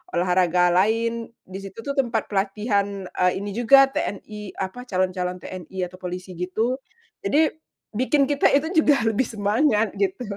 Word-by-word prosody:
olahraga 180 0 +3
lain. 230 +5 +1 0.2
Di 190 +1 -8
situ 195 +3 -9
tuh 280 - -2
tempat 230 -5 -1
pelatihan, 200 0 -1
eee, 180 0 +2
ini 205 - -4
juga 270 +5 +5
TNI 210 -3 -5
apa 220 +7 -5
calon-calon 185 -2 -1
TNI 185 0 -6
atau 185 +1 -7
polisi 180 +1 -6
gitu. 225 +8 -1 0.4
Jadi, 315 -6 +2 0.4
bikin 260 +6 +2
kita 285 +1 +3
itu 315 +5 +1
juga 290 -5 +3
lebih 225 +2 +1
semangat, 215 +1 +1
gitu. 195 +4 0
205 Hz, 145 wpm, -23 LUFS, 185-240 Hz, 0.4 s, juga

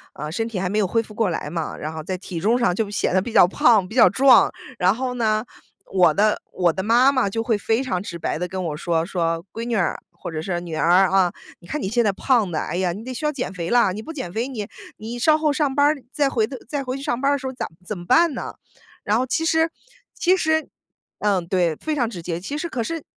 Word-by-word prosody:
呃， 150 +1 -5
身 225 +7 -2
体 200 -5 -4
还 185 - -1
没 210 +3 -1
有 205 - +3
恢 225 +5 +1
复 215 -1 -12
过 220 -3 +1
来 155 -3 -3
嘛， 165 -1 -4
然 155 +1 -5
后 155 -1 -6
在 185 +2 -3
体 175 -3 -6
重 235 +4 +2
上 210 -7 +2
就 215 -1 -1
显 200 -2 -1
得 185 - +3
比 235 +3 -6
较 175 - +6
胖、 205 -1 +3
比 220 - -10
较 245 - +7
壮。 260 -2 +5 0.3
然 185 +2 +3
后 250 +1 -3
呢， 220 -1 0 0.5
我 175 -5 +5
的 210 +3 +2
我 175 -3 +1
的 190 - -3
妈 240 +5 +5
妈 255 -7 +1
就 225 +3 -2
会 225 -2 +1
非 225 +4 0
常 200 -8 -2
直 170 -4 -7
白 - - -2
地 180 - -2
跟 185 0 -4
我 150 -2 -3
说， 165 +1 -1
说： 165 -2 -2
“闺 230 - -5
女 235 0 -3
儿” 175 - 0
或 - - -8
者 155 -1 -4
是 175 0 -2
“女 170 -2 -6
儿 180 +4 +4
啊， 190 -2 +3 0.3
你 175 - -17
看 300 -1 -3
你 - - -2
现 235 +3 +2
在 205 - +2
胖 215 -2 +1
得， 155 - -1
哎 - - -4
呀， 180 -1 0
你 210 +6 -8
得 255 - -5
需 305 - -7
要 300 - +2
减 255 -8 -4
肥 170 -2 -4
了。 235 -6 +3
你 215 - -5
不 320 - -8
减 260 - -6
肥， 235 +4 -2
你 215 -5 -5 0.3
你 230 +3 -6
稍 310 +5 +4
后 305 -2 +1
上 285 -2 0
班 285 +1 +3
儿， 295 -3 +1
再 285 -3 +1
回 225 -4 +1
的 255 +1 -8
再 285 0 -3
回 255 +1 -3
去 275 - -8
上 240 -1 -2
班 280 +1 +3
的 285 - +2
时 265 0 -6
候 260 - -4
咋 - - -4 0.2
怎 210 -1 -4
么 175 - -9
办 335 - +4
呢？” - - -6 0.5
然 210 +2 +1
后 255 - +1
其 325 +6 -1
实 320 0 +3 0.4
其 370 +2 +2
实 315 -2 0 0.5
嗯， 195 -4 +1
对， 175 -3 +1
非 310 - -3
常 240 -6 0
直 180 -7 -7
接。 170 0 -4
其 285 +11 -5
实 340 +2 -4
可 245 - -3
是 330 +6 -4
215 Hz, 295 characters per minute, -22 LUFS, 180-260 Hz, 0.5 s, 较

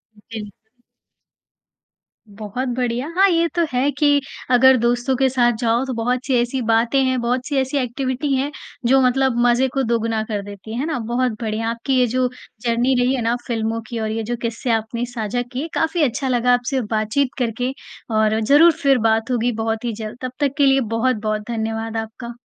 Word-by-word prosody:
बिल्कुल। 220 +1 -11 1.6
बहुत 215 +5 -5
बढ़िया। 245 +2 -1
हाँ, 390 +2 +6
ये 335 -1 +2
तो 340 -1 +2
है 255 +3 +2
कि 290 0 +3 0.3
अगर 260 +1 +6
दोस्तों 240 +3 +1
के 265 +1 +3
साथ 240 -2 +2
जाओ 235 +2 +1
तो 260 - -3
बहुत-सी 250 +3 -1
ऐसी 245 +2 -2
बातें 230 +4 +3
हैं, 260 -1 +1
बहुत-सी 250 +4 -1
ऐसी 265 +2 -2
एक्टिविटी 260 +2 -1
हैं 275 +3 -1 0.3
जो 265 +2 +5
मतलब 260 -1 +2
मज़े 245 +2 +3
को 270 -1 +1
दोगुना 230 -1 0
कर 215 -2 -3
देती 205 +2 -9
है। 235 - -3
है 280 - -1
ना? 315 -6 -2
बहुत 240 +2 0
बढ़िया, 225 0 -2
आपकी 235 +4 -2
ये 250 - +4
जो 255 +2 +1 0.3
जर्नी 240 +2 +1
रही 255 +2 +2
है 250 - -2
ना 230 +1 +1
फ़िल्मों 225 -1 -1
की 235 -2 -4
और 220 0 -2
ये 225 0 -2
जो - - 0
किस्से 230 +1 -3
आपने 225 +2 -1
साझा 240 -1 -3
किए, 270 +5 -3
काफ़ी 320 +1 0
अच्छा 265 0 0
लगा 250 -1 +2
आपसे 250 +2 0
बातचीत 220 +6 +1
करके 245 +1 -1 0.4
और 215 0 +2
ज़रूर 290 +9 +6
फिर 275 -2 +5
बात 225 +3 0
होगी 245 0 +1
बहुत 225 +1 -2
ही 235 - -1
जल्द। 215 +1 -7
तब 255 -1 -4
तक 285 -2 +1
के 285 - +4
लिए 270 0 +4 0.2
बहुत-बहुत 220 -3 0
धन्यवाद 225 0 -3
आपका। 230 +2 -6
245 Hz, 190 wpm, -20 LUFS, 225-265 Hz, 1.6 s, हाँ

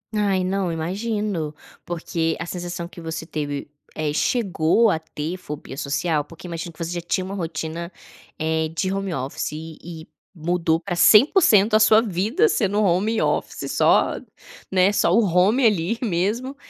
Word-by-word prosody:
Ai, 200 -3 +1
não, 190 -2 -1
imagino, 190 -1 -2 0.3
porque 165 -1 -2
a 165 - -4
sensação 175 -1 -5
que 175 - -12
você 160 0 -5
teve 145 -3 -4 0.2
eh, 155 -1 -2
chegou 205 +2 +2
a 165 - +1
ter 160 +1 -5
fobia 150 -6 -8
social? 145 +3 -1
Porque 165 +4 -12
imagino 170 0 -5
que 160 - -23
você 165 0 -3
já 175 -1 -3
tinha 185 +2 -2
uma 195 +2 -5
rotina, 165 0 -4 0.5
eh, 160 0 0
de 175 +4 -2
home 195 -2 -2
office 135 +1 -3
e 160 +1 -8
e 165 -1 -9 0.3
mudou 165 -1 0
para 180 0 -4
100% 215 - +6
a 215 - +6
sua 215 0 +6
vida 220 - +1
sendo 210 - +1
home 205 +4 +1
office - - -2
só - - +3 0.5
né, 190 +1 +4
só 170 - +2
o 220 +6 +5
home 195 +8 +3
ali 210 0 +2
mesmo. 225 +6 -1
175 Hz, 160 wpm, -22 LUFS, 160-205 Hz, 0.5 s, 100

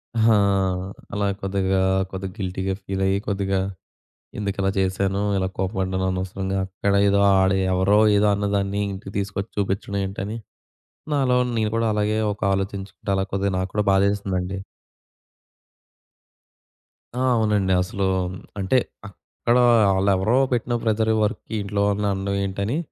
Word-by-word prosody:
ఆ! 110 0 +4 0.8
అలా 100 0 0
కొద్దిగా, 95 -1 0 0.3
కొద్దిగ 95 0 -5
గిల్టీగా 95 0 -2
ఫీల‌యి 95 0 0
కొద్దిగ 100 -2 -1 0.9
ఎందుకలా 100 -1 -1
జేశాను, 95 +1 0 0.2
ఇలా 95 -1 0
కోపపడ్డాను 95 -1 -1
అనవసరంగా. 95 +1 -3
అక్కడ 100 +1 -1
ఏదో, 100 0 +3 0.2
ఆడ 95 0 +3 0.2
ఎవరో 95 +3 +3 0.2
ఏదో 105 +1 +3
అన్నదాన్ని 100 0 -1
ఇంటికి 95 0 -8
తీసుకొచ్చి 100 +1 -3
చూపిచ్చడం 100 0 -1
ఏంటని, 100 +3 -4 0.8
నాలో 130 -3 +2 0.2
నేను 110 -2 0
కూడా 115 -1 +1
అలగే 105 +1 +1
ఒక 105 - -17
ఆలోచించుకుంటే 95 +1 -4
అలా 95 - 0
కొద్దిగ 100 0 0
నాక్కూడా 95 +3 -1
బాధేసిందండి. 95 -1 0 2.6
ఆ! - - +2
అవునండి. 105 -4 +2
అసలు 95 +2 -2 0.5
అంటే 95 +6 +2 0.3
అక్కడ 115 +4 -2 0.4
ఆళ్లెవరో 100 +4 +2 0.2
పెట్టిన 120 0 -1
ప్రెజర్ 110 0 +1
వర్క్‌కి 110 +1 -3
ఇంట్లో 100 0 -2
వాళ్ళని 105 0 0
అనడం 100 +1 -2
ఏంటని, 100 +7 -2
100 Hz, 120 wpm, -23 LUFS, 95-105 Hz, 2.6 s, ఆ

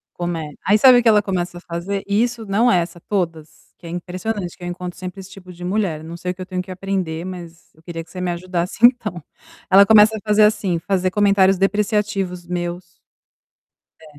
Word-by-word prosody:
Come 165 -4 -4
Aí, 205 +2 +5
sabe 250 +1 +7
o - - -1
que - - +2
ela 210 -1 +5
começa 180 -3 -3
a - - -10
fazer? 185 +4 -4
Isso 225 +2 0
não 215 +5 +2
é 180 - +4
essa, 170 0 -5
todas, 165 -5 -3 0.3
que 170 - -12
é - - -7
impressionante 180 +2 -5
que 180 - -13
eu - - -4
encontro 180 0 -6
sempre 185 +1 -7
esse 190 - -12
tipo 185 -1 -12
de 175 +1 -11
mulher, 180 -5 -1
não 165 +1 -8
sei 180 +1 -3
o - - -8
eu 185 - -6
tenho 185 -1 -3
que 185 0 -10
aprender, 185 -3 -3
mas 175 -2 -9
eu 160 - -24
queria 165 -1 -7
que - - -21
você 185 - -8
me 180 -1 -1
ajudasse 175 0 -3
então. 210 - +2 0.5
Ela 195 +1 +7
começa 220 +1 +6
a - - -6
fazer 210 0 +4
assim: 195 -5 +2
fazer 185 +1 -1
comentários 195 -2 +3
depreciativos 195 -2 -1
meus. 175 0 -5 1.1
É. - - -15
185 Hz, 210 wpm, -20 LUFS, 175-200 Hz, 1.1 s, sabe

